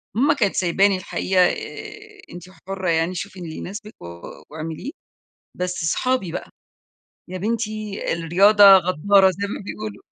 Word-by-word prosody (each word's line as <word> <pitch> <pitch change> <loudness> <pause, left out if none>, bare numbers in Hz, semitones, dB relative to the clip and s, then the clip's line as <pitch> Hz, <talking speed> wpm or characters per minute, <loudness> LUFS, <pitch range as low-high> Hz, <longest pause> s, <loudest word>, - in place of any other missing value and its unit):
ماما 280 +6 +3
كانت 210 -9 0
سايباني 190 +2 +2
الحقيقة، 185 0 0
آآ، 425 - -5
"أنتِ 175 - -9 0.2
حرّة 190 -2 -3
يعني 165 +2 0
شوفي 190 +2 -6
اللي 160 -3 -7
يناسبِك 210 +3 -8
و - - -10 0.4
واعمليه." 160 - -6 0.6
بس 180 -2 -3
صحابي 225 +2 0
بقى: - - -6 0.8
"يا 185 +1 -6
بنتي 215 0 -3
الرياضة 190 +6 +4
غدارة، 190 +2 +3
زي 200 +2 -4
ما 200 - -6
بيقولوا". 215 +1 -7
195 Hz, 135 wpm, -22 LUFS, 175-215 Hz, 0.8 s, الرياضة